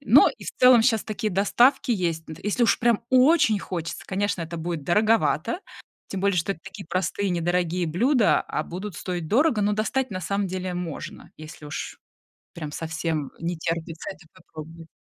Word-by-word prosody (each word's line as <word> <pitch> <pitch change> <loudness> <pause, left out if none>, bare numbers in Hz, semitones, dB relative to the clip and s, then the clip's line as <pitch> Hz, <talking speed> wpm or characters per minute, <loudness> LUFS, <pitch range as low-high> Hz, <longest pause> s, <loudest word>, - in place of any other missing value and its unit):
Но - - +6
и - - -11
в - - -4
целом 250 -2 +7
щас 225 -3 +2
такие 215 0 -3
доставки 240 +7 +3
есть. 170 -6 0
Д 160 - -7
если 210 +4 0
уж - - +3
прям 235 -2 +2
очень 255 -4 +5
хочется, 170 -4 -5
конечно, 195 -1 -1
это 165 +1 -6
будет 165 -3 -4
дороговато. 215 - +2 0.5
Тем 195 - -4
более, 200 -1 +2
что 180 +4 +1
это 170 - -15
такие 195 0 -9
простые 185 +3 -1
недорогие 175 0 0
блюда, 230 - +3
а - - -3
будут 185 +1 -6
стоить 175 -3 -4
дорого, 245 -3 +3
но 205 +1 +2
достать 225 +4 -1
на 185 -1 -4
самом 200 +4 -1
деле 185 0 -4
можно, 175 -4 -6
если 155 0 -11
уж 145 -1 -6 0.6
прям 155 -3 -6
совсем, 160 -2 -3
э, - - -12
не 170 0 -2
терпится 165 0 -4
это 160 - -10
попробовать. 165 -2 -11
185 Hz, 180 wpm, -25 LUFS, 165-215 Hz, 0.6 s, целом